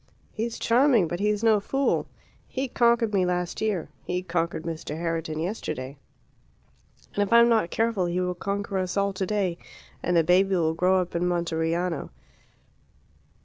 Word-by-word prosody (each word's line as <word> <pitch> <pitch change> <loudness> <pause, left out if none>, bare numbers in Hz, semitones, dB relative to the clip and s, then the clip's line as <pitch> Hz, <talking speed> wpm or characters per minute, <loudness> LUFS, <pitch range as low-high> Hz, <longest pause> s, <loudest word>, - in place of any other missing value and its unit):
He's 230 +1 -3
charming, 235 - +3
but 175 +2 -4
he's 210 +1 0
no 220 -2 +5
fool; 270 +7 0 0.4
he 265 +1 -3
conquered 235 -2 +2
me 190 -2 +3
last 180 -1 -2
year; 210 -6 -1 0.2
he 180 +1 -2
conquered 170 -2 -2
Mr. 160 -2 -5
Herriton 165 -2 -2
yesterday, 145 - -4 1.2
and 205 - 0
if 205 - 0
I 235 - +8
am 235 0 +6
not 220 -7 +2
careful 225 -4 0
he 175 +1 -1
will 180 0 0
conquer 200 +2 -3
us 185 +1 -2
all 200 0 +1
today, 190 -2 -1 0.4
and 175 -1 +1
the 165 - +5
baby 190 +3 +3
will 160 -2 +1
grow 185 +3 +3
up 180 - -6
in 175 +1 +1
Monteriano. 170 -1 -1
185 Hz, 160 wpm, -26 LUFS, 170-210 Hz, 1.2 s, I